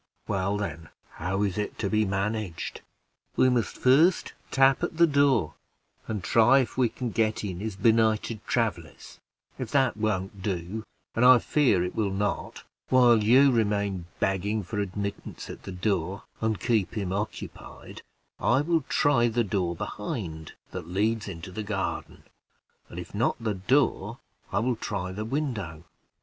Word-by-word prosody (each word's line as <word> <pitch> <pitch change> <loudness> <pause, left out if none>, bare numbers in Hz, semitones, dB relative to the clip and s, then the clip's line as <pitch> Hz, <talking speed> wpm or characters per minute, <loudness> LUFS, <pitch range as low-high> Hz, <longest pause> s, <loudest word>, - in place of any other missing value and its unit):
"Well, 100 0 0
then, 80 -6 -5 0.2
how 95 +4 -2
is 100 0 -1
it 105 - -3
to 105 - -1
be 110 +1 +2
managed?" 95 -2 -3 0.5
"We 130 - +4
must 120 -3 0
first 155 +8 +4 0.2
tap 135 0 +4
at - - -3
the 170 - +7
door, 140 - +2 0.5
and 105 -4 -3
try 120 +4 +5
if 125 - -4
we 125 -3 +2
can 125 -1 -4
get 110 -1 0
in 95 -3 -4
as 110 -2 -4
benighted 110 0 +2
travelers; 100 -9 -2 0.4
if - - -4
that 135 -5 +2
won't 100 -2 -2
do 95 +3 -3 0.3
and 115 - +1
I 125 0 +9
fear 120 -9 +2
it 90 - -3
will 105 -3 0
not 100 +2 -3 0.3
while 120 -4 +5
you 130 +6 +6
remain 100 -5 0
begging 100 +2 0
for 105 +4 -4
admittance 100 +1 -4
at - - -10
the - - -6
door, 95 0 -1 0.2
and 110 -3 0
keep 105 -3 0
him 95 -3 -2
occupied, 105 +2 -6 0.4
I 130 +3 +3
will 165 +1 +1
try 135 -5 +3
the 120 +1 +1
door 90 -4 -1
behind, 85 - -5 0.2
that 90 -3 -6
leads 105 +5 0
into 90 -1 -7
the 110 - -4
garden; 100 -2 -4 0.7
and - - -10
if - - -7
not - - +1
the 110 -2 -1
door, 115 +1 +1 0.3
I - - +1
will 120 0 0
try 95 -4 -3
the 105 +3 -4
window. 110 - -3
105 Hz, 160 wpm, -27 LUFS, 95-120 Hz, 0.7 s, I